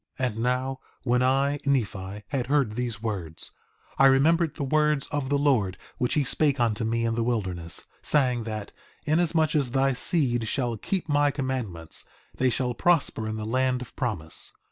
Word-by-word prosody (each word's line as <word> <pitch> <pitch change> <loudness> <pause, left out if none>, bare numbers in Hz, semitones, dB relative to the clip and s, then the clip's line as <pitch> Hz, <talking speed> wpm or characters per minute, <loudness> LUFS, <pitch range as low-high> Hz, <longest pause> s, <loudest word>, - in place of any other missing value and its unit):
4:14 130 - +2
And 110 - -9
now, 125 +2 0 0.2
when 125 0 +2
I, 135 +3 +2
Nephi, 105 -7 -1
had 135 -4 -1
heard 140 -5 +2
these 115 -2 -3
words, 90 -8 -4 0.5
I 135 - +8
remembered 155 +4 +3
the - - -3
words 150 0 +2
of 145 -3 -2
the 145 - +2
Lord 120 -10 +2 0.2
which 125 - 0
he 150 - +3
spake 140 +1 +2
unto 115 -2 +1
me 115 +1 0
in 115 - +1
the 115 0 0
wilderness, 95 -8 -2 0.2
saying 125 -5 +2
that: 110 -2 -5 0.3
Inasmuch 160 0 +2
as 140 -4 +2
thy 135 +2 +2
seed 125 -5 +1
shall 120 -1 -1
keep 180 - -2
my 145 -1 +3
commandments, 130 - -3 0.3
they 130 - +2
shall 125 0 -1
prosper 140 -6 +1
in 110 - -3
the 110 -1 -4
land 130 +2 +1
of 125 - -15
promise. 100 - -2
125 Hz, 175 wpm, -26 LUFS, 110-140 Hz, 0.5 s, I